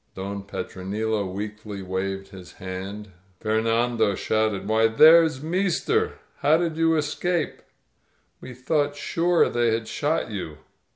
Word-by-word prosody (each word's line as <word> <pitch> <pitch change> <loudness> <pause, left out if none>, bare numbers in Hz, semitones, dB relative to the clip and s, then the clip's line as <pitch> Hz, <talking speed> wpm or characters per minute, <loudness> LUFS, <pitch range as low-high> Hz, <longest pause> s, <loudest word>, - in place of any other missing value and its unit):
Don 100 +1 -5
Petronilo 100 +2 -3
weakly 105 0 -6
waved 95 +1 -3
his 90 -3 -12
hand; 95 +2 -7 0.3
Fernando 115 -1 +1
shouted, 110 -1 0
*TVhy, 110 +1 +2
there's 160 -3 +7
meester! 200 - 0 0.2
How 155 +2 +4
did 165 -2 -1
you 165 0 +3
escape? 160 +2 -1 0.8
We 125 - -10
thought 145 +3 0
sure 170 +4 +2
they 120 -1 +1
had 110 0 -1
shot 145 -2 -1
you." 80 -7 -5
110 Hz, 120 wpm, -24 LUFS, 100-155 Hz, 0.8 s, there's